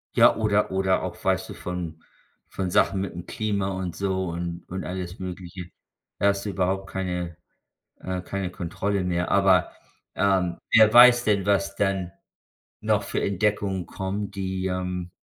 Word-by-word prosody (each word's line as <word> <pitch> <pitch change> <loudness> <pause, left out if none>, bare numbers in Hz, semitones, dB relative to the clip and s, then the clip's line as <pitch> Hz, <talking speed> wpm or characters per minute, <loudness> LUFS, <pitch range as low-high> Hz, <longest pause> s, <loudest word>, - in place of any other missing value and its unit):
Ja, - - +6
oder 105 -1 +1
oder 95 0 +1
auch - - -6
weißt - - 0
du - - -6
von 85 -3 -6 0.4
von 95 -2 -3
Sachen 95 +2 +3
mit'm 85 -2 -8
Klima 100 -3 -1
und 95 -3 -4
so 95 -1 -1
und 85 0 -4
und 95 +1 -5
alles 90 0 -5
Mögliche. 90 -1 -7 0.5
Da 100 - +2
hast 100 0 -1
du - - -2
überhaupt 95 0 -1
keine, 90 -3 -3 0.6
äh, 95 0 -3
keine 95 0 -4
Kontrolle 95 +3 -2
mehr. 90 -1 -1
Aber, 95 -3 +4 0.4
ähm, 95 -3 +1
wer 110 -1 +7
weiß 120 0 +8
denn, 100 -3 +1
was 100 -1 +1
dann 95 -3 0 0.7
noch - - +2
für - - -2
Entdeckungen 100 -2 0
kommen, 100 +1 -4
die, 95 -1 -3
ähm 90 -1 -3
95 Hz, 155 wpm, -25 LUFS, 90-100 Hz, 0.7 s, weiß